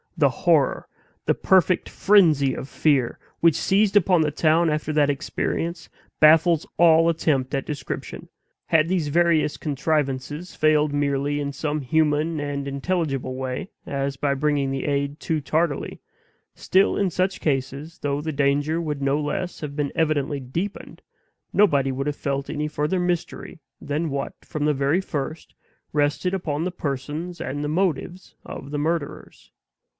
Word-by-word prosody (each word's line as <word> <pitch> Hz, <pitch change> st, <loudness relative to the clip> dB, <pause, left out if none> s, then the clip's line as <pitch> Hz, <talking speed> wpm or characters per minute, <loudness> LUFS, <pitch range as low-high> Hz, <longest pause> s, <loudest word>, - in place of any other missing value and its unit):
The -, -, +4 dB
horror, -, -, +1 dB, 0.4 s
the -, -, +3 dB
perfect 185 Hz, -1 st, +2 dB
frenzy 155 Hz, -10 st, +4 dB
of 135 Hz, -, -7 dB
fear, 140 Hz, -6 st, +1 dB, 0.2 s
which 165 Hz, -3 st, +4 dB
seized 200 Hz, +1 st, +2 dB
upon 180 Hz, -3 st, +4 dB
the 155 Hz, -, +2 dB
town 160 Hz, +2 st, +3 dB
after 155 Hz, 0 st, -1 dB
that 150 Hz, -1 st, +3 dB
experience, 165 Hz, +4 st, -3 dB, 0.3 s
baffles 160 Hz, +1 st, +5 dB
all 165 Hz, -1 st, +6 dB
attempt 150 Hz, -5 st, 0 dB
at 135 Hz, -, -2 dB
description. 145 Hz, -4 st, -6 dB, 0.4 s
Had 160 Hz, 0 st, +3 dB
these 175 Hz, -4 st, 0 dB
various 165 Hz, -1 st, +2 dB
contrivances 150 Hz, +2 st, -2 dB
failed 155 Hz, -1 st, +3 dB
merely 145 Hz, 0 st, 0 dB
in 140 Hz, -1 st, -2 dB
some 150 Hz, +1 st, -2 dB
human 155 Hz, +3 st, +1 dB
and 145 Hz, -1 st, -3 dB
intelligible 140 Hz, -3 st, -2 dB
way, 130 Hz, +6 st, -4 dB, 0.2 s
as 140 Hz, 0 st, -2 dB
by 140 Hz, +1 st, 0 dB
bringing 145 Hz, -1 st, 0 dB
the 135 Hz, -1 st, -3 dB
aid 140 Hz, +1 st, -1 dB
too 160 Hz, -1 st, -1 dB
tardily 155 Hz, +1 st, -1 dB, 0.5 s
still, 190 Hz, +2 st, +2 dB
in 200 Hz, -2 st, +1 dB
such 185 Hz, +2 st, -1 dB
cases, 140 Hz, +2 st, -2 dB
though 145 Hz, 0 st, -1 dB
the 155 Hz, +1 st, -3 dB
danger 145 Hz, +3 st, +1 dB
would 150 Hz, -3 st, -3 dB
no 140 Hz, +2 st, +1 dB
less 165 Hz, +5 st, -3 dB
have 145 Hz, -2 st, -5 dB
been 145 Hz, -2 st, -1 dB
evidently 150 Hz, -3 st, 0 dB
deepened, 195 Hz, -, -5 dB, 0.5 s
nobody 140 Hz, -10 st, +3 dB
would 135 Hz, +2 st, -3 dB
have 145 Hz, -, -1 dB
felt 140 Hz, -1 st, -3 dB
any 150 Hz, +1 st, -2 dB
further 150 Hz, +4 st, -1 dB
mystery 175 Hz, -1 st, -3 dB, 0.2 s
than 155 Hz, +3 st, -2 dB
what, 140 Hz, 0 st, -3 dB
from 150 Hz, -1 st, -3 dB
the 150 Hz, -, +3 dB
very 140 Hz, +6 st, +1 dB
first, 155 Hz, -2 st, -5 dB, 0.4 s
rested 150 Hz, +5 st, +1 dB
upon 160 Hz, -5 st, -2 dB
the 180 Hz, -, -2 dB
persons 155 Hz, +3 st, -4 dB
and 145 Hz, +2 st, -4 dB
the -, -, -1 dB
motives 175 Hz, +2 st, -2 dB
of 140 Hz, -, -8 dB
the 145 Hz, -, -2 dB
murderers. 160 Hz, -1 st, -4 dB
150 Hz, 150 wpm, -23 LUFS, 140-165 Hz, 0.5 s, all